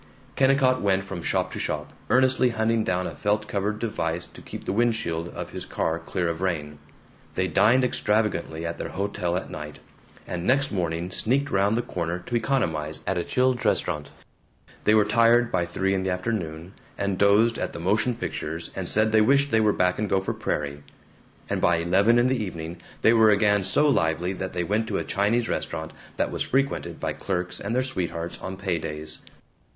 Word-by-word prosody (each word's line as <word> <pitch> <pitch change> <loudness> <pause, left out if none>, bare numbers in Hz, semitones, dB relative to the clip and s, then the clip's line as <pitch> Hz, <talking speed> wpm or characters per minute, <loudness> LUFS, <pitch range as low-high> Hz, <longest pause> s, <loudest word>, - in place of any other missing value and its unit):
Kennicott 135 -1 +3
went 95 -1 +2
from 95 -2 -6
shop - - 0
to - - -5
shop, - - -3 0.2
earnestly 130 0 +4
hunting 115 0 +1
down 90 -2 0
a - - -3
felt 105 +1 0
covered 105 +1 -1
device 90 -7 -2
to - - -14
keep - - -8
the - - -1
windshield 110 -8 0
of - - -7
his - - -6
car 80 +1 -2
clear 90 -1 -2
of 85 +1 -3
rain. 75 -5 -2 0.6
They 95 - +1
dined 115 +10 +4
extravagantly 105 -8 0
at 85 0 -4
their - - -4
hotel 90 -3 -2
at 95 - -6
night, 75 -1 -7 0.5
and 85 -1 -4
next 135 +7 +2
morning 85 -2 -2
sneaked 140 +8 0
round 100 +3 +2
the 120 - 0
corner 85 0 -3
to 90 +7 -5
economize 80 - -1
at 95 -2 0
a - - -1
Childs' 125 +3 +1
Restaurant. 85 -8 0 0.8
They 105 - +5
were 105 -1 +5
tired 115 +2 +4
by 85 - 0
three 95 +2 0
in 95 - 0
the 95 - -1
afternoon, 90 -3 -3 0.2
and 100 -2 -1
dozed 105 +3 +4
at - - -2
the - - -7
motion 110 +7 +1
pictures 80 -6 -4
and 90 -3 -3
said 110 +1 +3
they 110 0 +5
wished 140 +5 +3
they 110 - +4
were 105 -1 +4
back 90 -1 +1
in 105 - 0
Gopher 95 -1 0
Prairie 70 -1 -3 0.7
and - - -2
by 85 - +4
eleven 95 +8 +3
in 120 - +4
the 130 -3 +1
evening 85 -2 -6 0.2
they 115 - +6
were 110 -1 +6
again 105 0 +4
so 125 +10 +3
lively 85 - +1
that 95 0 -5
they 90 -1 -1
went 105 +5 0
to 105 - -1
a - - -1
Chinese 110 +4 +1
restaurant 80 -1 -3 0.2
that - - 0
was - - -4
frequented 135 +1 -1
by - - -2
clerks 90 -2 -3
and 105 +4 -3
their 130 - +2
sweethearts 85 -9 -4
on 95 0 -5
pay 95 -3 -1
days. 75 0 -4
100 Hz, 195 wpm, -25 LUFS, 85-115 Hz, 0.8 s, they